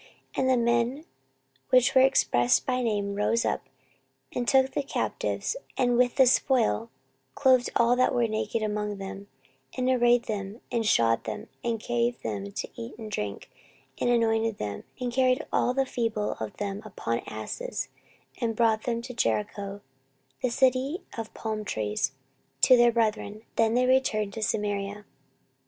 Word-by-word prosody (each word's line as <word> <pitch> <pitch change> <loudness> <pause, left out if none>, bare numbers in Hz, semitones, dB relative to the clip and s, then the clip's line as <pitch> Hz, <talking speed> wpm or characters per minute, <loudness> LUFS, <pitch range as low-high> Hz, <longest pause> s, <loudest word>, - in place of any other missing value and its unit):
14:028:015 - - -10
And 260 - +2
the 260 - +4
men 235 +5 +1 0.6
which 255 -1 +5
were 260 - +6
expressed 120 - +3
by 255 -1 0
name 205 -4 -1
rose 210 +3 +1
up, 135 - -2 0.6
and 245 -1 -2
took 265 0 +4
the - - -1
captives, 275 - -2 0.2
and 245 -1 +2
with 245 0 +3
the 265 - +6
spoil 245 -2 +2 0.5
clothed 255 -2 +4
all 235 +1 +4
that 255 0 +3
were 240 -2 +2
naked 220 +1 -2
among 210 -1 -2
them, 195 +1 -7 0.5
and 255 0 0
arrayed 240 -1 +4
them, 205 -1 -5
and 230 -3 0
shod 115 - +3
them, 110 - -5
and 230 -1 -1
gave 240 +1 0
them 100 -2 -4
to - - -4
eat 115 - -8
and 220 -2 -8
to - - -1
drink, 105 +5 -5 0.5
and - - +1
anointed 225 -2 +2
them, 100 -1 -5
and 245 -1 -3
carried 255 +3 +2
all - - +3
the 270 +1 +1
feeble 225 -5 -1
of 110 -1 -6
them 200 0 -3
upon 115 - -3
asses, - - -5 0.5
and 230 -3 -1
brought 220 -1 +2
them 235 -1 -1
to 250 0 -7
Jericho, 200 - -2 0.6
the 250 - +1
city 265 +5 +1
of 225 -2 -5
palm 215 -1 -3
trees, 110 - -1 0.5
to 255 - +8
their 240 -1 +5
brethren: 220 -2 -1
then 225 0 +2
they 250 +1 +3
returned 220 -6 +2
to 220 - -5
Samaria. 205 -1 -2
230 Hz, 165 wpm, -27 LUFS, 205-250 Hz, 0.6 s, to